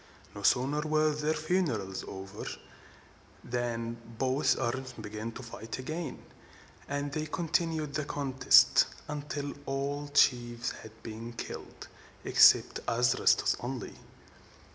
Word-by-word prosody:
No - - -8
sooner 140 +4 +3
were 155 0 +2
their 150 +1 0
funerals 155 - -1
over, 95 0 -7 1.0
than 115 -1 -2 0.2
both 130 +3 +2
armies 130 +1 -2
began 110 +1 -6
to 130 - -8
fight 115 -1 -7
again; 155 +2 -5 0.6
and 140 0 -2
they 155 +1 -2
continued 160 -2 -1
the 150 0 -1
contest 135 -2 +5 0.2
until 145 -1 -4
all 140 +2 -2
the 145 - -12
chiefs 120 -3 +3
had 110 0 -14
been 115 +1 -7
killed 115 - -8 0.4
except - - +6
Adrastus 120 +1 +3
only. 125 -1 -5
135 Hz, 115 wpm, -30 LUFS, 120-150 Hz, 1.0 s, except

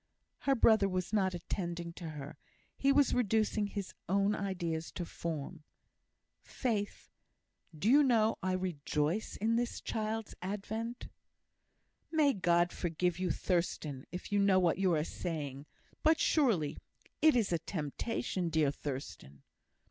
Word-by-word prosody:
Her 270 - +5
brother 220 -4 +5
was 185 +1 -2
not 190 -3 +2
attending 170 -1 -4
to 170 -1 -7
her; 150 -1 -7 0.4
he 275 - +3
was 280 -1 +4
reducing 220 -2 +2
his 200 -1 -5 0.2
own 200 +2 +3
ideas 175 -6 -3
to 175 - -4
form. 160 -1 -5 0.8
"Faith, 215 -5 -3 0.7
do 185 - -1
you 280 +5 +7
know 225 -5 +3
I 185 0 0
rejoice 170 +1 -1
in 225 +3 +1
this 240 0 -1
child's 220 0 -3
advent?" 220 +5 -4 1.0
"May 305 -4 +4
God 175 -2 +2
forgive 175 0 -1
you, 185 -1 0
Thurstan! 160 -5 -1
if 180 +3 -7
you 205 - +3
know 200 -1 +5
what 180 -1 +2
you 190 -2 +3
are 150 - +1
saying. 150 -5 -5 0.3
But, 315 0 +4
surely, 220 - +2 0.4
it 315 -3 +6
is 215 -7 +2
a 170 - +1
temptation, 175 - -2
dear 155 -3 +2
Thurstan." 95 - -7
185 Hz, 135 wpm, -33 LUFS, 165-220 Hz, 1.0 s, you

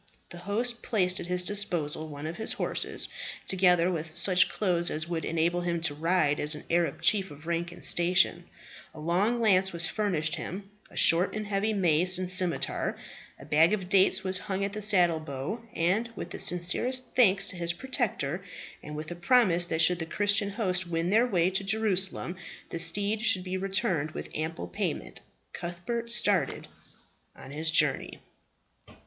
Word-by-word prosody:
The 175 - -9
host 235 +6 -2
placed 185 -5 0
at - - -7
his 180 0 -2
disposal 175 -6 -2
one 145 0 -9
of 165 +2 -6
his 220 - 0
horses, - - -2 0.4
together 180 -2 +3
with 160 -2 -4
such 180 +2 +3
clothes 175 -4 -1
as 155 +2 -4
would 165 -2 -4
enable 170 +3 -1
him 175 -1 -2
to 160 -3 0
ride 155 -1 0
as 150 +1 +1
an 150 - -9
Arab 170 -4 0
chief 195 -3 +3
of 145 +2 -13
rank 170 +1 -3
and 175 - -9
station; 175 0 +2 0.5
a - - -10
long 185 +9 0
lance 190 -4 +3
was 170 -1 0
furnished 170 -7 -1
him, 195 +3 -8 0.2
a - - -14
short 180 +5 +5
and 215 0 -4
heavy 205 +1 -1
mace, 180 -2 +4
and 185 -1 -1
scimitar; 180 -2 -1 0.4
a - - -12
bag 160 +6 +3
of 190 -4 -3
dates 195 -1 +3
was 185 -1 +1
hung 195 0 -3
at 200 - -5
the 215 - -5
saddle 180 -6 +4
bow; 155 - -6
and 190 +8 0
with - - -7
the - - -6
sincerest 240 +9 +3
thanks 195 -5 +4
to 200 - -4
his 170 -1 0
protector, 185 - -3 0.4
and 150 0 -9
with 155 +2 -7
a - - -5
promise 175 -2 +2
that 160 -1 +1
should 175 +1 +3
the 160 - -3
Christian 205 +2 +1
host 185 -4 -1
win 170 +1 -2
their 230 +4 +3
way 180 -5 +1
to 190 +1 -1
Jerusalem 195 -3 -1 0.3
the 170 - -4
steed 200 +6 +1
should 185 -5 +3
be 185 0 -5
returned 190 -5 -1
with - - -8
ample 155 - -4
payment, 90 - -5 0.3
Cuthbert 180 +8 -5
started 205 -5 +2 0.7
on 130 - -12
his 155 +2 -2
journey. 165 - +1
180 Hz, 180 wpm, -27 LUFS, 165-200 Hz, 0.7 s, short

